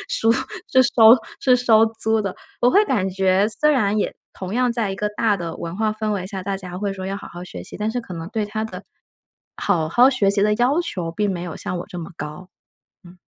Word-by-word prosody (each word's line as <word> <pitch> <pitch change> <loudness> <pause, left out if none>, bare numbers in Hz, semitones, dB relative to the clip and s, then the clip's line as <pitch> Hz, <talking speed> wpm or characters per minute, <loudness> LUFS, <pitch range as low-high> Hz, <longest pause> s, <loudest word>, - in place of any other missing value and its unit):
叔 225 0 +2 0.4
是 260 - +6
收 230 -2 +7 0.3
是 255 -2 +4
收 225 -3 +5
租 220 0 0
的， 195 -2 -3 0.3
我 245 - +5
会 405 - +5
感 195 -7 0
觉 190 +1 +2
虽 300 +8 +2
然 215 -7 +2
也 - - -1 0.2
同 190 +2 -6
样 250 -1 +2
在 225 -4 0
一 195 - -4
个 210 +1 -1
大 210 0 +1
的 170 -2 -5
文 170 +1 -5
化 215 0 0
氛 215 0 -3
围 195 -3 -2
下， 190 -1 -6
大 195 0 -2
家 180 -1 -7
会 200 -1 -2
说 190 -1 -7
要 195 - -3
好 - - -9
好 175 +1 -9
学 90 - -8
习， - - -8
但 210 +1 -2
是 245 - -2
可 190 -6 -9
能 165 0 -6
对 220 -2 -2
他 215 +1 -3
的 220 - -7 0.8
好 165 -6 0
好 245 +8 +6
学 205 -7 +2
习 200 0 +2
的 210 0 +3
要 255 +8 +2
求 175 - -4
并 205 +3 -1
没 175 -2 -4
有 175 - -6
像 180 - -4
我 - - -6
这 180 - -7
么 165 - -8
高。 150 +5 -8 0.6
嗯。 175 +1 -15
205 Hz, 260 characters per minute, -21 LUFS, 185-225 Hz, 0.8 s, 收